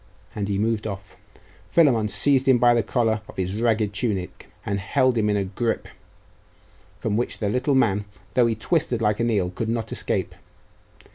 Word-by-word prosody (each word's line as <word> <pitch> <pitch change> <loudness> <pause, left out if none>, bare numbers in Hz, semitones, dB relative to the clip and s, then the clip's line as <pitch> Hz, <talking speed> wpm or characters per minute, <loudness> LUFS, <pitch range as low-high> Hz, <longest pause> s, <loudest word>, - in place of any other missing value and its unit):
And 100 -1 -3
he 100 -1 -1
moved 110 +1 0
off. 100 -1 -8 0.5
Philammon 130 -10 +3
seized 130 +7 +3
him 130 -2 +6
by 120 0 +5
the 120 - +3
collar 110 -1 0
of - - -12
his 95 0 -2
ragged 110 -3 +1
tunic, 100 -4 -3 0.2
and 100 -1 -1
held 125 +6 +1
him 105 -2 +1
in 105 - +1
a 100 - 0
gripe 110 +5 -2 1.1
from 105 -1 -1
which 120 - -2
the 105 - -1
little 125 +5 +1
man, 105 -5 +2 0.3
though 125 -2 +4
he 115 - 0
twisted 125 0 0
like 105 -1 +1
an 120 0 +1
eel 95 -5 0
could 110 +4 -4
not 115 -1 -2
escape. - - -1
110 Hz, 185 wpm, -23 LUFS, 100-120 Hz, 1.1 s, him